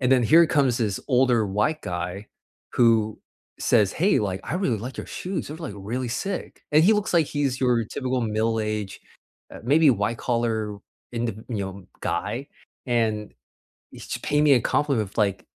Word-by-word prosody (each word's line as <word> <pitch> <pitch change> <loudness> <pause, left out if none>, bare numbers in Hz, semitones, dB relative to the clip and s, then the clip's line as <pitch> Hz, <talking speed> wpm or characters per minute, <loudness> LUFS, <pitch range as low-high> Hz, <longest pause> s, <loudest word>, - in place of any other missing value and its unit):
and 125 -1 +1
then 125 -2 +4
here 165 +7 +6
comes 135 -6 +2
this 105 -4 -1
older 125 -4 +3
white 105 +11 0
guy 90 +3 -4 0.4
who 115 -3 +3 0.4
says, 105 -5 +3
"Hey, 190 +6 +3
like, 95 -2 -2
I 155 - -3
really 135 - 0
like 125 +5 -7
your - - -5
shoes, 185 -3 -4
they're, 155 - -6
like, 160 -11 -6
really 115 +6 -4
sick," 190 +11 -4
and 155 +1 +6
he 215 - +6
looks 210 -1 -1
like 165 -3 +4
he's 140 -3 -1
your 120 -3 +2
typical 130 +3 -2
middle-aged, 110 -2 -1 0.5
uh, - - -9
maybe 150 +4 +5
white-collar 110 -1 -1 0.3
in 120 0 -1
th 110 -3 -4
you 115 - -3
know, 95 -1 -4 0.3
guy, - - -3 0.4
and 110 -3 0 0.6
he's - - -6
paying 150 +1 +2
me 140 - +7
a 120 - +4
compliment 135 -9 +1
of, - - -20
like, 100 -3 +1
120 Hz, 175 wpm, -24 LUFS, 105-140 Hz, 0.6 s, me